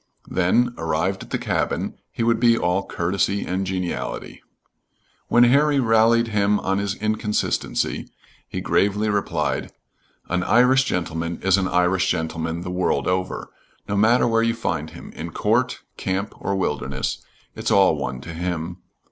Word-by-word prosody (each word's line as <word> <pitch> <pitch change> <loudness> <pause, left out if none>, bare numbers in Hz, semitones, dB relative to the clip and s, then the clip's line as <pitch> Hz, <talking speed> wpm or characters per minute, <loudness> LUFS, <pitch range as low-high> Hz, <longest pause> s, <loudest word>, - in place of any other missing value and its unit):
Then, 120 +7 +2
arrived - - -1
at - - -10
the - - -1
cabin, - - -1 0.2
he - - -2
would 115 -1 +2
be 115 -1 +4
all 90 +1 0
courtesy 100 +3 0
and 95 +1 -2
geniality. 90 -2 -4 0.9
When 120 - +5
Harry 140 +4 +4
rallied 115 0 +4
him 105 -1 +2
on 95 +1 0
his 100 -1 -2
inconsistency, 110 0 -1 0.4
he - - -4
gravely 105 +2 +1
replied: 100 -1 -1 0.6
"An 90 +1 0
Irish 125 +7 +4
gentleman 85 -4 -2
is 95 -1 +4
an 95 - 0
Irish 90 +1 +2
gentleman 80 0 -2
the 90 0 -5
world 90 0 0
over, 90 0 -2 0.4
no 100 - -1
matter 110 +4 +4
where 115 -1 +2
you 115 0 +1
find 90 -9 -2
him, - - -11
in - - -7
court, - - +1 0.2
camp, 95 +2 -2
or 100 - -1
wilderness; 75 -7 -2 0.3
it's - - -2
all 95 -4 +5
one 65 -4 -4
to 85 - -8
him. 85 0 -3
95 Hz, 150 wpm, -23 LUFS, 90-115 Hz, 0.9 s, When